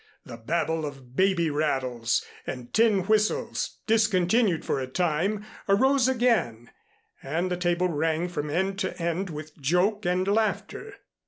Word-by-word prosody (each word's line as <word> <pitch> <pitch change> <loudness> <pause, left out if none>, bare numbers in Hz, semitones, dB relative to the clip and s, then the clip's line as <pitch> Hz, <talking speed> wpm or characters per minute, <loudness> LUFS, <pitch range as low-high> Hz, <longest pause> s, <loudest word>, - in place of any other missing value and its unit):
The 115 - -9
babel 160 +6 -1
of 135 -4 -8
baby 185 -3 +2
rattles 130 -6 0 0.2
and 125 -2 -6
tin 220 -3 +4
whistles, 215 - 0
discontinued 220 -3 +2
for - - 0
a 130 - -3
time, 180 +8 -1 0.2
arose 260 +5 +4
again 220 - +1 0.5
and 170 +7 -2
the - - +1
table 175 0 +1
rang 160 +1 0
from 150 -4 -4
end 190 +5 -1
to 190 -2 -3
end 170 +3 -2
with 155 -1 -8
joke 180 +9 +1
and 180 +1 +1
laughter. 225 - -1
175 Hz, 140 wpm, -26 LUFS, 150-205 Hz, 0.5 s, tin